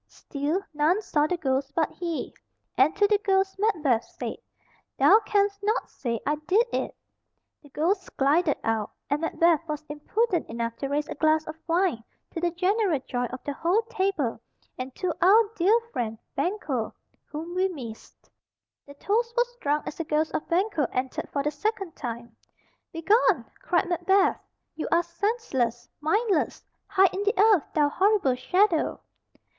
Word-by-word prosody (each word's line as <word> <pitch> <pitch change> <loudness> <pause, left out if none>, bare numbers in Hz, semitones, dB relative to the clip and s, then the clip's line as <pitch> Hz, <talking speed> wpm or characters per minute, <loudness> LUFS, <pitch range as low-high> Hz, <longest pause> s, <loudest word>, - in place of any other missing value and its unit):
Still 300 +7 -3
none 305 +6 +2
saw 300 -5 +1
the 360 - -1
ghost 275 -2 -1
but 320 -3 +1
he, 340 -3 -4 0.4
and 280 +6 +4
to 410 - +4
the 410 0 +3
ghost 385 -1 +1
Macbeth 310 - +2
said, - - -6 0.6
"Thou 315 +11 +7
canst 400 -1 +2
not 425 +3 -1
say 235 -3 -3
I 295 +1 +1
did 420 +6 +4
it." - - -2 0.6
The 290 - -17
ghost 330 +9 -1
glided 295 +3 +3
out, 220 -2 0 0.2
and 290 +2 +1
Macbeth 330 -1 +3
was 305 0 -4
impudent 350 +6 -1
enough 230 0 -3
to 275 - -3
raise 290 +2 -1
a - - -4
glass 315 +1 +2
of 310 - -7
wine 335 -9 +1 0.3
"to 330 - -5
the 350 - +2
general 365 -1 +1
joy 245 -2 -2
of 255 +1 -7
the 285 - -3
whole 355 +10 +1
table, 375 - -1 0.3
and 255 0 -6
to 365 -3 -1
our 405 +6 +7
dear 410 +6 +4
friend 225 -2 -2 0.2
Banquo, 280 - -2 0.3
whom 320 +3 -7
we 370 +1 +2
miss." 240 -10 -9 0.7
The 285 - -12
toast 460 +9 -1
was 485 0 +1
drunk 295 +1 0
as - - -6
the 330 - -2
ghost 310 0 0
of - - -3
Banquo 345 - +1
entered 255 0 -3
for 280 - -2
the 300 - 0
second 390 +2 -3
time. 235 -3 -6 0.6
"Begone!" 340 - +3 0.2
cried 350 +1 +1
Macbeth. 370 +3 +2 0.3
"You 315 - -4
are 340 - +4
senseless, 340 - -2
mindless! 380 +3 0 0.2
Hide 385 -2 +4
in 385 - -2
the 415 +3 0
earth, 415 -6 +5
thou 295 -2 +4
horrible 385 -5 +2
shadow." 335 +7 +1
330 Hz, 160 wpm, -26 LUFS, 285-390 Hz, 0.7 s, Thou